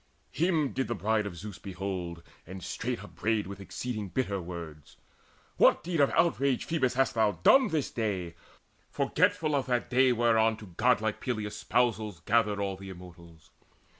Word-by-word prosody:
Him 160 Hz, -4 st, +1 dB
did 130 Hz, -, -1 dB
the 120 Hz, -, -2 dB
Bride 105 Hz, +1 st, 0 dB
of 95 Hz, -, -7 dB
Zeus 100 Hz, +2 st, -8 dB
behold, 90 Hz, -3 st, -5 dB, 0.2 s
and 95 Hz, 0 st, -8 dB
straight -, -, -3 dB
Upbraided 110 Hz, -1 st, -1 dB
with 100 Hz, +1 st, -8 dB
exceeding 105 Hz, +1 st, -5 dB
bitter 100 Hz, -4 st, -1 dB
words: 85 Hz, -4 st, -9 dB, 0.6 s
"What -, -, +5 dB
deed 170 Hz, -2 st, -2 dB
of 140 Hz, -, +5 dB
outrage, 140 Hz, -6 st, +2 dB
Phoebus, 130 Hz, -7 st, 0 dB
hast 135 Hz, +1 st, +2 dB
thou 110 Hz, -3 st, +2 dB
done 265 Hz, -1 st, +7 dB
This 155 Hz, -4 st, -1 dB
day, 95 Hz, -7 st, -2 dB, 0.6 s
forgetful 155 Hz, -2 st, +1 dB
of 140 Hz, -2 st, 0 dB
that 125 Hz, 0 st, -1 dB
day 130 Hz, +1 st, +5 dB
whereon 115 Hz, -2 st, +3 dB
To 105 Hz, -5 st, -12 dB
godlike 110 Hz, -2 st, +2 dB
Peleus' 110 Hz, -5 st, -3 dB
spousals 110 Hz, -6 st, 0 dB
gathered 105 Hz, +1 st, +2 dB
all 100 Hz, -1 st, -2 dB
The 95 Hz, 0 st, -9 dB
Immortals? 85 Hz, -3 st, -13 dB
110 Hz, 160 wpm, -29 LUFS, 95-125 Hz, 0.6 s, done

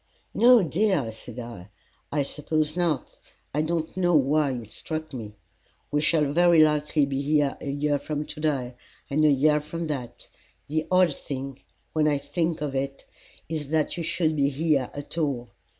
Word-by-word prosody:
"No, 240 Hz, -2 st, +6 dB
dear," 170 Hz, -, +1 dB
said 115 Hz, +2 st, -9 dB
I, 115 Hz, -6 st, -8 dB, 0.4 s
"I 145 Hz, -1 st, +1 dB
suppose 155 Hz, +2 st, -1 dB
not. 170 Hz, -6 st, -1 dB, 0.3 s
I 150 Hz, -, +1 dB
don't 160 Hz, 0 st, -2 dB
know 175 Hz, -2 st, +2 dB
why 145 Hz, 0 st, +3 dB
it 115 Hz, -4 st, -7 dB
struck 155 Hz, +3 st, -4 dB
me. 110 Hz, -4 st, -7 dB, 0.6 s
We 150 Hz, -, +2 dB
shall 160 Hz, -1 st, +3 dB
very 170 Hz, +1 st, +5 dB
likely 150 Hz, -1 st, +3 dB
be 135 Hz, 0 st, -2 dB
here 145 Hz, -1 st, +2 dB
a 140 Hz, -, -4 dB
year 145 Hz, +1 st, 0 dB
from 150 Hz, 0 st, -3 dB
to 150 Hz, 0 st, -9 dB
day, 135 Hz, -5 st, -1 dB, 0.4 s
and 155 Hz, +2 st, +2 dB
a 155 Hz, -, +6 dB
year 150 Hz, +2 st, +4 dB
from 165 Hz, +3 st, -5 dB
that. 125 Hz, -5 st, -5 dB, 0.4 s
The 155 Hz, +2 st, -1 dB
odd 180 Hz, -3 st, +4 dB
thing, 135 Hz, -1 st, -6 dB, 0.3 s
when 155 Hz, -1 st, +2 dB
I 145 Hz, -1 st, +2 dB
think 160 Hz, +2 st, -2 dB
of 145 Hz, -2 st, -2 dB
it, 135 Hz, 0 st, -3 dB, 0.4 s
is 155 Hz, -3 st, -4 dB
that 155 Hz, -1 st, +1 dB
you 175 Hz, -, -4 dB
should 160 Hz, -1 st, 0 dB
be 140 Hz, -1 st, +2 dB
here 145 Hz, -2 st, +1 dB
at 145 Hz, +3 st, -5 dB
all. 130 Hz, -6 st, -1 dB
150 Hz, 175 wpm, -26 LUFS, 140-160 Hz, 0.6 s, No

